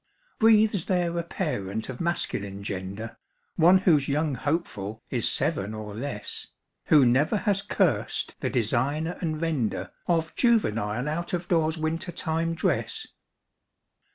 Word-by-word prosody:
Breathes 215 -4 +4
there 175 -2 0
a - - -2
parent 110 - -3
of 130 -2 -6
masculine 100 - -1
gender, 100 +3 -5 0.4
One 175 +3 +6
whose 160 -7 +3
young 150 +1 0
hopeful 115 - -3
is - - +2
seven 100 +3 0
or 105 -1 -7
less, 110 -2 -3 0.4
Who 145 -4 +6
never 135 - +3
has 200 -1 +1
cursed 205 - 0
the - - -1
designer 135 +8 0
and 155 -3 -2
vender 155 -9 -1 0.2
Of 165 -2 +1
juvenile 125 - +1
out 170 +5 -3
of 175 0 -2
doors 160 -2 +2
winter 160 +3 -2
time 165 0 -1
dress? 440 - -1
155 Hz, 130 wpm, -26 LUFS, 115-175 Hz, 0.4 s, One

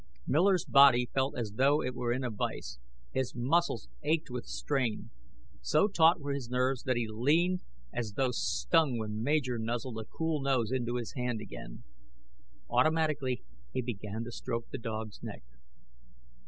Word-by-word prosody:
Miller's 180 +3 +3
body 130 -3 +6
felt 135 0 0
as 115 -4 -2
though 140 +3 +4
it 125 - -2
were 120 -1 -1
in 130 +2 -1
a 125 - -2
vise. 100 - -4 0.3
His 130 -1 -2
muscles 125 - +1
ached 155 -3 0
with 125 -1 -5
strain. 60 - -1 0.5
So - - +3
taut 170 -3 +5
were 145 -1 -3
his 135 -4 -4
nerves 125 +1 +1
that 130 -2 +2
he 120 -2 0
leaped 155 +12 +2 0.3
as 110 -4 -3
though 130 +2 +1
stung 150 +1 +2
when 110 -1 -3
Major 130 -2 +1
nuzzled 115 +1 -3
a 110 - -6
cool 160 +3 -2
nose 130 -4 +1
into 120 -2 -1
his 120 -2 -3
hand 125 -4 -2
again. - - -9 0.8
Automatically, 155 - +1 0.3
he 130 - -1
began 110 -1 -4
to 120 - -7
stroke 115 0 -4
the - - -4
dog's 110 -2 -5
neck. - - -7
125 Hz, 160 wpm, -31 LUFS, 115-140 Hz, 0.8 s, body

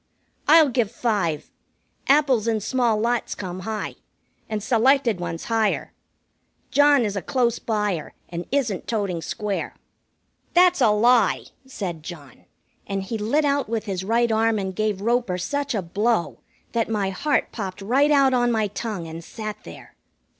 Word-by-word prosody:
"I'll 315 -1 +7
give 240 -4 +1
five. 205 -10 -1 0.6
Apples 270 -6 +3
in 225 -1 +1
small 235 0 +1
lots 235 +2 -1
come 185 -2 -6
high, 215 +3 -4 0.5
and 215 -2 -3
selected 240 -1 +3
ones 170 -1 -4
higher. 225 -2 0 0.8
John 285 -4 +5
is 205 -1 -2
a 195 - -2
close 240 +5 0
buyer, 210 -7 -2
and 170 0 -6
isn't 245 -9 -1
toting 200 -7 -1
square." 210 +2 -3 0.8
"That's 360 0 +5
a - - +6
lie!" 220 0 +3 0.2
said 185 -10 -5
John, 150 -5 -11 0.4
and 195 -1 -2
he 220 +3 -4
lit 285 +9 +1
out 280 -4 +1
with 225 -1 -2
his 190 -3 -3
right 230 +3 +2
arm 220 0 +2
and 190 -2 -3
gave 210 -2 -1
Roper 235 -4 +1
such 280 +9 -2
a 200 - -1
blow 200 0 0 0.3
that 230 -1 0
my 205 -3 0
heart 290 +10 0
popped 195 -4 -5
right 260 +9 +2
out 275 -3 +4
on 245 -1 +2
my 220 -3 +1
tongue 205 -4 -4
and 165 +1 -8
sat 215 +2 -6
there. 85 - -12
220 Hz, 155 wpm, -23 LUFS, 195-245 Hz, 0.8 s, I'll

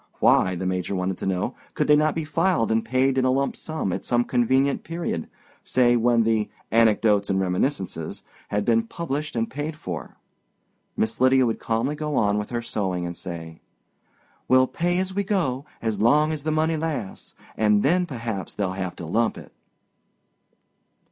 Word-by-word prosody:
Why, 95 0 +4
the 95 - -4
Major 90 +1 -1
wanted 90 0 -2
to - - -3
know, 95 -1 -1 0.2
could - - +1
they 150 - +6
not 150 +1 +2
be 160 -1 -2
filed 165 -7 +1
and 110 0 +2
paid 130 +2 +2
in - - +1
a - - +3
lump 135 +2 +1
sum 155 - -3
at - - -4
some 120 0 +2
convenient 130 +3 +1
period—say 125 - -1
when 120 0 +3
the 110 -1 +1 0.2
Anecdotes 110 -2 +3
and 95 -1 +1
Reminiscences 95 - -2 0.2
had 105 0 -1
been 115 -1 +2
published 150 -2 -4
and 115 -1 0
paid 150 +3 -4
for? 90 - -7 0.8
Miss 110 +2 -1
Lydia 130 0 +5
would 115 - -1
calmly 115 +5 -1
go 150 -1 -3
on 105 0 +2
with 105 - -5
her 120 -1 -3
sewing 95 -6 -2
and 85 0 -5
say, 80 -3 -7 0.9
"We'll 130 0 +5
pay 175 +6 -1
as 190 0 -1
we 200 +1 0
go 165 - -1 0.2
as 110 -3 -1
long 150 +7 +4
as 155 -2 -3
the 155 +2 -1
money 160 +1 +1
lasts, 150 -10 -4 0.2
and 105 -1 +3
then 180 +5 +2
perhaps 115 - -5
they'll 100 -3 -1
have 95 -1 -4
to 85 - -7
lump 110 +7 0
it." - - -11
120 Hz, 175 wpm, -24 LUFS, 100-150 Hz, 0.9 s, they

